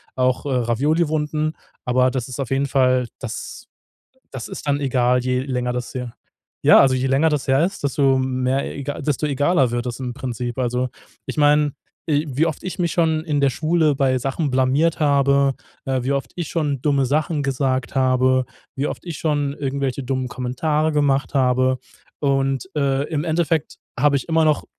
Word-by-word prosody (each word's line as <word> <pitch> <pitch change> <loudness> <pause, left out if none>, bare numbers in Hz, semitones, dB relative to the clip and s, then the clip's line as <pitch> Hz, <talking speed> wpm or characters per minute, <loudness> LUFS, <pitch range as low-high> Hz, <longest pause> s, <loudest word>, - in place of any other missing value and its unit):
auch, 130 +1 +1
äh, 145 - -2
Ravioli-Wunden. 150 +5 0 0.3
Aber 125 +1 +2
das 130 -1 -3
ist 130 - -7
auf 135 -4 -3
jeden 135 +1 +1
Fall 130 -2 +2
das - - -7 0.7
das 130 -3 -7
ist - - -8
dann 145 0 +1
egal, 125 -2 +2
je 125 0 0
länger 125 -2 -2
das 125 0 -4
her 125 -2 -5 0.5
ja, - - +7
also 135 -1 +4
je 130 +1 0
länger 135 +5 +3
das 145 -3 -1
her 135 +4 +4
ist, 195 +3 -4
desto 135 -1 +2
mehr 130 +1 0
ega 140 +1 -5
desto 150 +1 -1
egaler 145 -1 +2
wird 120 +1 -2
das 120 - -4
im 125 -2 -4
Prinzip. 120 -2 -4
Also 125 0 0 0.4
ich - - -5
meine, 150 0 +4 0.4
i 150 0 +1
wie 145 +4 +1
oft 160 -3 -4
ich 185 - -5
mich 170 -3 0
schon 160 -2 +1
in 150 -3 0
der 140 -1 +3
Schule 155 +2 +1
bei 130 -2 +2
Sachen 135 +3 -2
blamiert 135 +6 +2
habe, 140 -2 +3 0.3
äh, 130 -1 -1
wie 135 - 0
oft 135 -4 -2
ich 175 - -3
schon 145 -6 -1
dumme 140 -3 +2
Sachen 150 +2 0
gesagt 130 -2 -1
habe, 130 0 +3 0.3
wie 140 +2 0
oft - - -6
ich 170 -4 -6
schon 145 -3 0
irgendwelche 140 -2 -2
dummen 130 0 -2
Kommentare 150 +6 -1
gemacht 145 -1 +1
habe. 130 -1 +2 0.4
Und, 135 +3 0
äh, 140 -2 +1
im 150 -3 -1
Endeffekt 160 -1 0 0.2
habe 145 +1 +4
ich 135 - -4
immer 160 0 +3
noch 155 -1 +2
135 Hz, 185 wpm, -21 LUFS, 130-150 Hz, 0.7 s, ja